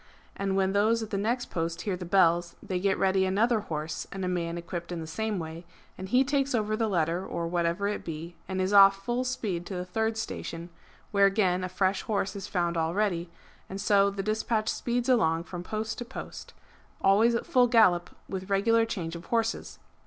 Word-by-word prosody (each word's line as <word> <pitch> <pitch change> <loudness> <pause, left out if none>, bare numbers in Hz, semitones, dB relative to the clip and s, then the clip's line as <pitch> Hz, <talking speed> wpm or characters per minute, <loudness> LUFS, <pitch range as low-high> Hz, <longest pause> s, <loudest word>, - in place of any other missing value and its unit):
And 195 -1 -1
when 190 0 +1
those 220 +3 +2
at 215 - -8
the - - -1
next 240 +4 -1
post 165 -1 -2
hear 200 -3 -2
the 180 0 -7
bells 175 -2 +3
they 185 -1 -2
get 195 +1 +1
ready 190 0 +2
another 215 +5 +2
horse 155 -5 -4
and 190 -1 -4
a - - -1
man 170 -2 -2
equipt 170 0 -6
in 175 - -3
the 160 - -5
same 210 +6 -2
way, 165 0 -6 0.3
and 190 0 -7
he 250 +5 +4
takes 275 -1 0
over 215 -1 0
the 225 0 0
letter 170 -2 0
or 170 -3 -3
whatever 170 +3 0
it 205 - -3
be, 165 +1 -6
and 190 0 -3
is 185 +2 0
off 195 0 +7
full 240 +1 0
speed 210 -9 -2
to 195 - -5
the 180 0 -3
third 220 +4 -1
station, 170 -5 -5 0.4
where 200 -1 +5
again 190 -3 +1
a 185 - -3
fresh 190 +1 0
horse 205 -4 -2
is 200 - -6
found 175 -2 -1
all 165 +1 0
ready, 180 -5 0 0.4
and 195 - -5
so 200 0 +4
the 200 0 -4
despatch 215 +1 0
speeds 245 +1 -1
along 165 -10 +3
from 175 0 -7
post 220 +4 -4
to - - -3
post, - - -9 0.5
always 215 +5 +4
at 235 - -2
full 250 -1 +4
gallop, 185 -7 +4 0.2
with 190 0 -5
regular 225 +4 +3
change 175 -7 -4
of 170 - -9
horses. 230 -1 -1
195 Hz, 210 wpm, -28 LUFS, 175-220 Hz, 0.5 s, off